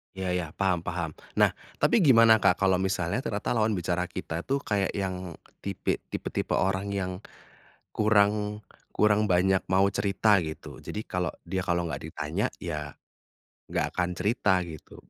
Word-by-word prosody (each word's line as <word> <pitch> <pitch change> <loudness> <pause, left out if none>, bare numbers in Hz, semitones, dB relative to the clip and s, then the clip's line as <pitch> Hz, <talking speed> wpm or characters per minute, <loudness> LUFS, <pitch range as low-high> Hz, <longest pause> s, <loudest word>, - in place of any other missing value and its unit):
Ya 95 -1 -2
ya, 85 -3 -3
paham 95 -3 +1
paham. 85 -3 -2 0.2
Nah, - - +5 0.3
tapi 240 - +4
gimana 115 - +7
Kak, 95 -2 +4
kalau 95 -2 +3
misalnya 95 +1 0
ternyata 105 -7 -3
lawan 110 -2 +2
bicara 90 0 -1
kita 80 -1 -5
tuh 140 +1 0
kayak 100 -2 0
yang 95 -3 -3 0.2
tipi 100 -2 -2
tipe-tipe - - -2
orang 95 +1 0
yang 95 -2 -2 0.8
kurang 105 0 +2 0.3
kurang 105 0 +3
banyak 95 +1 +3
mau 95 +1 +4
cerita 100 +1 +3
gitu. 80 -1 -7
Jadi, 105 - -6
kalau 90 -1 -1 0.2
dia 95 -1 -1
kalau 85 -2 0
enggak 75 -4 -5
ditanya, 80 +6 -2
ya 75 -5 -5 0.7
enggak - - 0
akan 90 0 0
cerita 95 -2 +2
gitu 80 -4 -10
95 Hz, 150 wpm, -27 LUFS, 90-105 Hz, 0.8 s, gimana